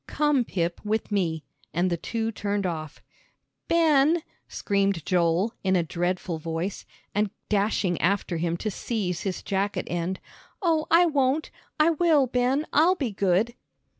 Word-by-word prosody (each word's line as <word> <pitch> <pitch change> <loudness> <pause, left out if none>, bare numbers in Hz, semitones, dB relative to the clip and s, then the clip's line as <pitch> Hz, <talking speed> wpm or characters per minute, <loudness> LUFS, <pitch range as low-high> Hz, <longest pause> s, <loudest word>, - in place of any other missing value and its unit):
"Come, 295 -4 +2
Pip, 170 -4 -2
with 220 +1 -2
me," 165 -6 0 0.3
and 175 +2 +1
the - - +2
two 225 +6 -3
turned 205 -2 -2
off. 155 -4 -5 0.6
"Ben," 320 -1 +4 0.2
screamed 200 -5 0
Joel, 175 +4 +2
in 190 -1 +2
a 175 - +3
dreadful 175 0 -2
voice, 165 +4 -4 0.3
and 210 0 +1 0.2
dashing 200 -3 +1
after 185 -1 +1
him 170 +1 -1
to 215 +4 -3
seize 185 -5 -3
his 190 -3 -3
jacket 200 +1 -1
end. 175 +2 -2 0.4
"Oh, 325 -5 +1
I 340 +2 +6
won't 285 -1 +1 0.3
I 310 +2 +5
will, 315 -4 +3
Ben, 255 +4 +1
I'll 340 +5 +5
be 270 -10 -2
good." 200 +4 +1
200 Hz, 145 wpm, -26 LUFS, 175-270 Hz, 0.6 s, I